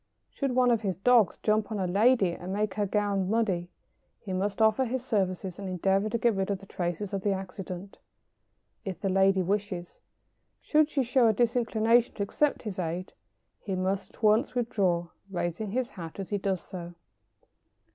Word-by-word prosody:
Should 275 -3 -2
one 250 -1 +4
of 230 -2 +2
his 195 -4 -1
dogs 225 -1 +4
jump 215 0 +1
on 215 - -2
a 190 - 0
lady 200 +1 +3
and 180 +2 -6
make 205 0 -1
her 205 -1 -1
gown 200 -2 0
muddy, 195 -6 0 0.5
he 190 - -6
must 195 +3 -1
offer 220 +4 +4
his 255 +1 -3
services 190 -4 -1
and 195 -2 -5
endeavour 195 +3 +1
to 235 - 0
get 235 0 +2
rid 195 0 -1
of 200 - 0
the 195 - -14
traces 180 +2 -3
of 195 - -1
the 200 0 +1
accident, 190 0 -7 0.8
if 190 -5 -5
the 195 - -1
lady 190 0 +3
wishes. 190 -2 -3 0.6
Should 305 0 +3
she 275 -4 +1
show 250 0 +3
a 220 - +4
disinclination 235 0 +2
to 200 - -1
accept 290 +8 0
his 205 -5 -5
aid, 175 +2 -3 0.5
he 195 -3 -4
must 190 +1 -2
at - - -22
once 220 +5 +3
withdraw, 190 -8 0 0.2
raising 180 +2 -3
his 250 +4 -2
hat 165 -1 -8
as 195 - -6
he 205 - 0
does 190 -2 -1
so. 175 -2 -8
200 Hz, 185 wpm, -28 LUFS, 185-225 Hz, 0.8 s, one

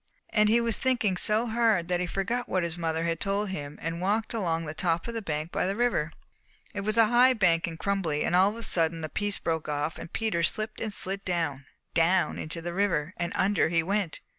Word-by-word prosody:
"And 215 -1 +4
he 230 +2 +4
was 235 -1 -1
thinking 240 -7 +1
so 215 +5 +4
hard 225 -6 +2
that 180 -1 0
he 180 - -1
forgot 235 +7 -2
what 185 -1 +1
his 170 -1 -2
mother 165 -1 -2
had 165 0 -1
told 200 +1 -1
him, 145 -5 -6
and 165 +1 -4
walked 215 +5 0
along 165 -7 -1
the 150 - -5
top 165 +2 -1
of 235 - -4
the 230 - -3
bank 155 -3 -4
by - - 0
the 195 - -1
river. 220 -10 0 0.6
It 200 - -3
was 215 +2 -1
a 225 - +7
high 245 +3 +5
bank 175 -6 +2
and 165 -1 -6
crumbly; 175 -6 -1
and - - +1
all 190 +2 +5
of 210 - -6
a 230 - -4
sudden 165 -3 +2
a 155 - -3
piece 205 +3 0
broke 160 -2 -2
off 150 +2 -2
and - - -9
Peter 220 -7 -1
slipped 215 +5 -1
and 220 - -2
slid 195 0 -4
down, 160 -7 -2 0.3
down 175 +3 +2
into 165 +1 -5
the 175 0 -4
river, 180 -4 0
and 170 0 -2
under 190 -4 +2
he 165 -1 +2
went. 195 -2 -2
185 Hz, 235 wpm, -27 LUFS, 165-215 Hz, 0.6 s, a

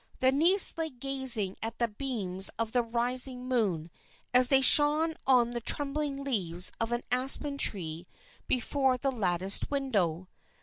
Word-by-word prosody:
The 260 -1 +1
niece 335 +6 +4
lay 320 -1 -3
gazing 255 -7 0
at 225 +1 -7
the 235 - -2
beams 205 -5 -5
of 225 -1 -3
the 245 - -1
rising 250 +2 +1
moon 190 -10 -4 0.4
as 250 0 +5
they 270 - +4
shone 300 +4 +6
on 245 -3 +1
the 240 0 -7
trembling 280 +2 -3
leaves 180 -10 0
of 230 +1 -4
an 240 0 -5
aspen 270 +3 -1
tree 170 -6 -1 0.4
before 260 +1 -3
the 275 +2 -4
latticed 190 -4 +1
window. 195 - -4
250 Hz, 145 wpm, -26 LUFS, 205-275 Hz, 0.4 s, shone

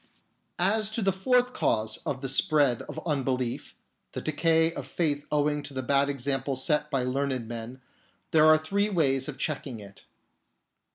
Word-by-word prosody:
As 210 +4 +2
to 225 - -1
the 195 -1 +2
fourth 250 +6 +1
cause 110 - 0
of 135 -2 -3
the 135 - -3
spread 145 -4 +2
of - - -6
unbelief 130 -5 -2 0.2
— - - -50
the - - -4
decay 160 +1 +2
of - - -7
faith 145 -4 -1
owing 150 0 +1
to 140 -1 -9
the 130 - -3
bad 140 +2 +2
example 135 0 -1
set 150 +3 +1
by 135 -4 0
learned 130 -2 -2
men 120 +2 -7 0.2
— - - -39
there 155 -1 +5
are 155 0 +7
three 200 +7 -1
ways 135 -8 +1
of 145 - -7
checking 140 -6 -3
it. 100 -1 -13
145 Hz, 175 wpm, -27 LUFS, 130-160 Hz, 0.2 s, are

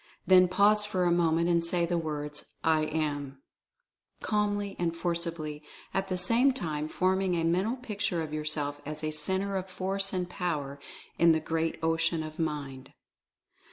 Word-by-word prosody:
Then 185 -1 +7
pause 205 +3 +4
for 195 -3 -1
a 175 - +3
moment, 170 -1 +2
and 170 -1 +3
say 170 0 +1
the 175 +1 -1
words, 150 -2 -4
"I 155 -1 +3
AM," 145 -3 -3 0.8
calmly 205 -1 -1
and 170 -1 0
forcibly, 170 -3 -3 0.3
at 195 - 0
the 185 -1 -1
same 230 +9 +4
time 155 - -3
forming 185 +2 +1
a 165 - 0
mental 185 +8 +1
picture 205 -9 -2
of 155 -1 -7
yourself 150 -1 -2
as 155 +1 -5
a 155 - -1
Centre 190 +6 -1
of 190 0 -5
Force 195 +1 0
and 180 -2 -2
Power 150 -6 -3 0.4
in 170 -1 +6
the 160 - +2
Great 160 +1 -1
Ocean 165 0 +1
of 155 +1 -8
Mind. 145 -5 -4
170 Hz, 160 wpm, -29 LUFS, 155-190 Hz, 0.8 s, Then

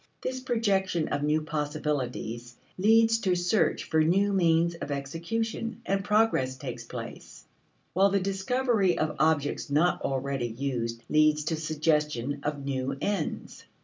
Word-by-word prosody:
This 260 0 -2
projection 200 -9 0
of 145 - -1
new 150 +1 +1
possibilities 145 -6 -3 0.2
leads 225 +3 +4
to 185 -4 +1
search 175 +4 +1
for 160 - +1
new 195 +5 +2
means 170 -2 +3
of 165 - -7
execution, 210 - -3
and 195 0 0
progress 210 -12 +2
takes - - -6
place; - - -9 0.5
while 195 +3 +4
the 200 0 +2
discovery 195 +1 +1
of 155 -1 -1
objects 155 -2 +1
not 160 +5 +2
already 135 -2 -1
used 115 -1 -3
leads 155 0 +3
to 160 +2 -1
suggestion 150 -4 0
of 145 -1 -3
new 135 -1 -2
ends. 195 -2 -3
155 Hz, 135 wpm, -28 LUFS, 145-195 Hz, 0.5 s, leads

